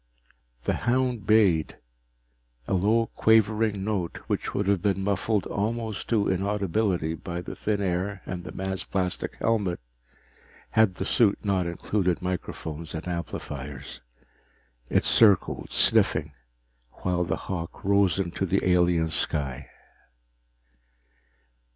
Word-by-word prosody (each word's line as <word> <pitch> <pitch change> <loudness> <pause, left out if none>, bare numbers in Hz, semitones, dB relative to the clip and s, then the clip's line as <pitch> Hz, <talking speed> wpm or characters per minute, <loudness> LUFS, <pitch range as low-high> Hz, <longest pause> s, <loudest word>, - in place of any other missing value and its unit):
The - - 0 0.2
hound 125 -5 0
bayed, 100 -8 +3 0.9
a - - -1
low 110 +5 +3
quavering 110 -2 +3
note 100 -5 -2
which - - -2
would 100 - 0
have 100 -2 +2
been 95 -1 0
muffled 100 0 0
almost 110 0 -3
to 110 -4 +2
inaudibility 95 -3 0
by 85 +1 -5
the - - -7
thin 105 -1 -1
air 95 +2 -2
and 90 -1 -5
the 90 - -8
man's 95 0 -3
plastic 90 -2 -2
helmet 105 -6 0 0.9
had 110 -4 +3
the - - -3
suit 105 -4 +3
not 95 -3 +1
included 90 +1 -1
microphones 85 -3 -5
and 80 +3 -6
amplifiers. 70 -5 -6 0.9
It - - +2
circled, 105 -5 +4
sniffing, 75 0 +3 0.7
while 90 -1 +1
the 85 - -2
hawk 85 -3 -5
rose 100 -2 +3
into 95 0 -2
the 95 +1 +1
alien 90 -2 +3
sky. 70 -4 0
95 Hz, 120 wpm, -26 LUFS, 85-105 Hz, 0.9 s, circled